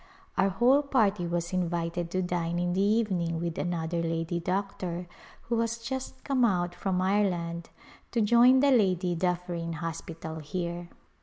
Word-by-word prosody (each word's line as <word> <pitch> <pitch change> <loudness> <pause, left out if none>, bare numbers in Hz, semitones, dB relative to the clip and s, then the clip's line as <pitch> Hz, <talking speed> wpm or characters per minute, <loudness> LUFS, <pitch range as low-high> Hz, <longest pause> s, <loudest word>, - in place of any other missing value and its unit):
Our 195 - +3
whole 245 +9 +4
party 210 -10 +1
was 170 +1 -2
invited 170 -1 -1
to 185 +2 -1
dine 175 -1 -1
in 175 0 0
the 190 - +1
evening 195 -6 +1
with 170 -1 -3
another 170 -1 -1
lady 165 +1 -1
doctor 180 -1 -3 0.4
who 235 -1 -1
has 230 0 0
just 255 +3 -6
come 265 -3 +1
out 175 -6 +2
from 185 0 -1
Ire 200 +1 +3
land 170 -1 -4 0.4
to 235 - -1
join 240 +4 +6
the 280 0 +4
Lady 185 -7 +2
DufFerin 175 -1 -2
Hospital 165 0 -6
here. 170 +2 -4
180 Hz, 155 wpm, -28 LUFS, 170-205 Hz, 0.4 s, join